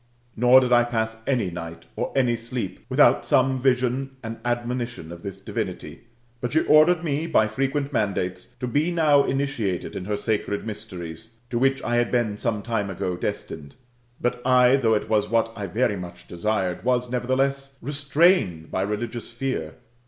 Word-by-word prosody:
Nor 125 +3 +6
did 125 -1 +1
I 120 0 +6
pass 110 -2 -2
any 120 -9 +1
night, 85 -1 -7
or - - -2
aiiy 125 -3 +3
sleep, 115 -4 -4
without - - +5
some 130 0 +2
vision 130 +1 +1
and 115 0 -6
admonition 120 -6 -3
of 85 0 -9
this 100 0 -7
divinity; - - -5 0.3
but 120 - -3
she 160 - +4
ordered 160 +3 +5
me 155 0 -1
by 110 -9 +3
frequent 135 +5 -2
mandates 95 -5 -1
to - - -2
be 145 +7 +1
now 155 -5 +4
initiated 135 -9 -2
in 90 - -5
her 105 +1 -1
sacred 105 -1 -2
mysteries, 95 -3 -8 0.2
to 120 - 0
which 135 +1 +2
I 120 0 0
had 120 -1 +1
been 120 -4 +1
some 105 -1 -2
time 110 -4 -1
ago 90 -1 -2
destined. 80 -6 -5 0.4
But 120 0 -1
I, 125 0 +5
though 115 -4 +3
it 105 - -2
was 105 -2 +1
what 115 0 +1
I 100 -3 -4
very 110 +1 0
much 90 -1 -9
desired, 95 0 -1
was, 125 0 +1
nevertheless, 135 +2 -1
restrained 145 - +2
by 95 - -1
religious 110 +4 -3
fear. 120 -10 -3
120 Hz, 170 wpm, -24 LUFS, 105-135 Hz, 0.4 s, Nor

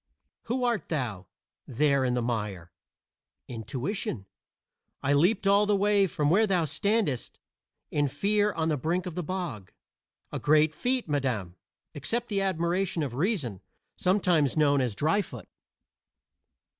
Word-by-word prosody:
"Who 250 +2 -1
art 235 -9 0
thou, 115 - -3 0.4
there 140 +1 +2
in 125 -1 +1
the 120 - 0
mire?" 105 -7 -3 0.8
"Intuition. 130 - -4 0.8
I 140 - +2
leaped 185 +9 +3
all 200 +1 +4
the 205 - +3
way 200 0 +3
from 150 -3 0
where 215 +5 +4
thou 180 -4 +2
standest 200 - -1 0.5
in 145 -1 +1
fear 205 +8 +1
on 160 -2 -1
the 150 - +1
brink 170 +7 -1
of 180 - -5
the 180 - -3
bog." 155 - -5 0.6
"A - - -3
great 155 +1 +4
feat, 250 +5 0
madam; 125 - -1 0.4
accept 225 - -3
the 200 -2 0
admiration 180 -2 0
of 135 -5 -4
Reason, 140 - -1 0.3
sometimes 180 -7 +2
known 145 -2 +4
as 120 -5 -1
Dryfoot." 160 - -1
160 Hz, 135 wpm, -28 LUFS, 130-195 Hz, 0.8 s, all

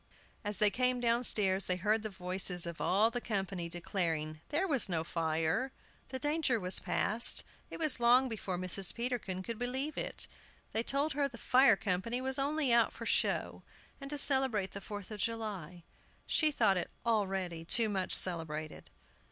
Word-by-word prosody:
As 205 -2 -3
they 210 0 +3
came 250 +3 0
downstairs 225 -5 +2
they 180 - +1
heard 210 +4 0
the 215 - -5
voices 180 -2 0
of 170 -2 -7
all 210 +5 +2
the 245 0 -4
company 190 -6 -4
declaring 165 -3 -3
there 330 +6 0
was 270 - +4
no 165 -3 -1
fire; 165 +9 -1 0.4
the 260 - -5
danger 290 -3 0
was 185 -1 +4
past. 225 +3 +3 0.3
It - - -8
was 310 -6 +2
long 245 +2 +4
before 200 -6 -4
Mrs. 185 +1 +1
Peterkin 235 -6 -3
could 230 +2 -6
believe 260 +5 -2
it. - - -3 0.4
They 220 - 0
told 280 +5 -1
her 280 0 0
the 255 -4 -12
fire 255 -1 +4
company 195 +5 -2
was 265 +1 -2
only 285 -2 +1
out 235 -1 +3
for - - -9
show, - - 0 0.4
and 275 - -8
to 295 - -3
celebrate 265 -9 +3
the 200 - -7
Fourth 205 +1 -8
of 210 - -7
July. 195 -6 -4 0.4
She 310 - +2
thought 215 -9 +2
it 180 - -3 0.2
already 190 -7 -1
too 225 +7 +1
much 190 -3 -1
celebrated. 155 -3 +1
215 Hz, 170 wpm, -32 LUFS, 185-250 Hz, 0.4 s, was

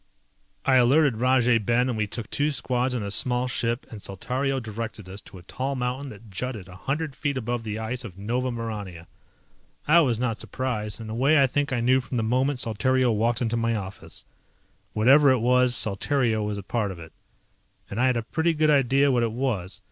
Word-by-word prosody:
I 130 -1 +5
alerted 130 0 +4
Rajay 125 -1 +3
Ben 120 +4 +1
and 125 - -1
we 105 -1 -1
took 110 +2 -4
two 145 +1 +1
squads 125 -3 0
and 110 -4 -2
a 100 - -4
small 125 +4 +1
ship 120 0 -1
and 110 -3 -8
Saltario 130 +8 -2
directed 110 -3 -6
us 95 +2 -7
to - - -14
a 90 - -13
tall 135 +9 -3
mountain 130 +2 -3
that 110 -1 -13
jutted 110 -1 -4
a 90 - -12
hundred 145 - -3
feet 145 -3 -2
above 120 -1 -2
the 110 -1 -4
ice 110 +3 -3
of 100 -6 -9
Nova 120 +6 -1
Maurania. 105 -8 -5 0.8
I 165 +3 +7
was 130 -8 +2
not 115 -1 -2
surprised. 110 -5 -4
In 110 - -7
a 110 - -5
way 140 +6 +3
I 135 - +6
think 145 +3 -1
I 120 -2 0
knew 130 +2 +3
from 125 0 -5
the 115 - 0
moment 130 +5 +1
Saltario 125 +2 +1
walked 115 +3 0
into 115 0 -1
my 115 0 0
office. 100 -2 -7 0.7
Whatever 135 +6 +6
it 130 - +4
was 125 +1 +3
Saltario 110 +2 0
was 105 -1 -3
part 105 +1 -1
of 95 - -7
it. 80 -1 -12 0.7
And 105 +4 -3
I 130 - +4
had 125 -2 +2
a 115 - -2
pretty 160 +7 0
good 155 0 +3
idea 140 0 +3
what 125 -2 +2
it 115 -1 0
was. 110 -7 -2
120 Hz, 210 wpm, -25 LUFS, 110-130 Hz, 0.8 s, I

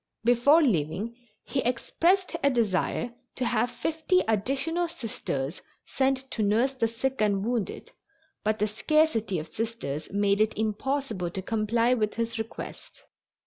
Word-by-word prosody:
Before 245 +7 +5
leaving 200 - 0 0.3
he 275 - -2
expressed 335 +10 +1
a 280 - +6
desire 235 0 0 0.2
to 255 - -1
have 240 0 +1
fifty 320 +9 +1
additional 275 - 0
Sisters 175 - -4 0.2
sent 265 0 0
to 225 - -2
nurse 225 +6 +2
the 240 -4 +1
sick 240 +3 -2
and 200 -1 +2
wounded, 235 -4 -2 0.5
but 215 0 +1
the 210 - +2
scarcity 225 - +1
of 155 0 -6
Sisters 220 -10 -3
made 200 +1 +2
it 215 0 +1
impossible 220 -2 -1
to 190 +2 -5
comply 230 +3 +2
with 215 -4 0
his 230 0 -2
request. 220 +1 -7
230 Hz, 140 wpm, -27 LUFS, 210-265 Hz, 0.5 s, a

